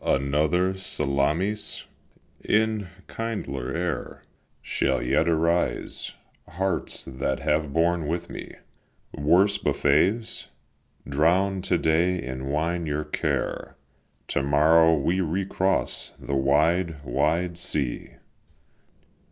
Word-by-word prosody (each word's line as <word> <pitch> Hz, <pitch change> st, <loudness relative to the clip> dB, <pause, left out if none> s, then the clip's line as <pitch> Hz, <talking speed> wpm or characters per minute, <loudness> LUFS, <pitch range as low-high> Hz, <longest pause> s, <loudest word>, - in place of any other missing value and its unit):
Another 75 Hz, +7 st, +1 dB
Salamis 85 Hz, +3 st, -1 dB, 0.6 s
in 110 Hz, -2 st, +1 dB, 0.2 s
kindlier 100 Hz, -, -4 dB
air 85 Hz, -4 st, -3 dB, 0.4 s
Shall 65 Hz, -2 st, 0 dB
yet 65 Hz, +7 st, +1 dB
arise. 85 Hz, -4 st, 0 dB, 0.3 s
Hearts, 95 Hz, +3 st, -2 dB
that 65 Hz, 0 st, -3 dB
have 75 Hz, -1 st, 0 dB
borne 85 Hz, +1 st, +1 dB
with 85 Hz, +3 st, -2 dB
me -, -, -8 dB, 0.6 s
Worse 90 Hz, +8 st, +3 dB
buffets! 95 Hz, +11 st, +1 dB, 0.6 s
drown 90 Hz, +7 st, +2 dB
to 90 Hz, -1 st, +1 dB
day 85 Hz, +3 st, +2 dB
in 65 Hz, -2 st, -5 dB
wine 80 Hz, +4 st, -1 dB
your 75 Hz, +1 st, -1 dB
care; -, -, -2 dB, 0.5 s
To -, -, +1 dB
morrow 80 Hz, +3 st, +5 dB
we 85 Hz, +7 st, +1 dB
recross 95 Hz, +2 st, -1 dB
the -, -, -5 dB
wide, 75 Hz, +4 st, +2 dB
wide 85 Hz, +6 st, 0 dB
sea!" 70 Hz, -7 st, -2 dB
80 Hz, 95 wpm, -25 LUFS, 70-90 Hz, 0.6 s, morrow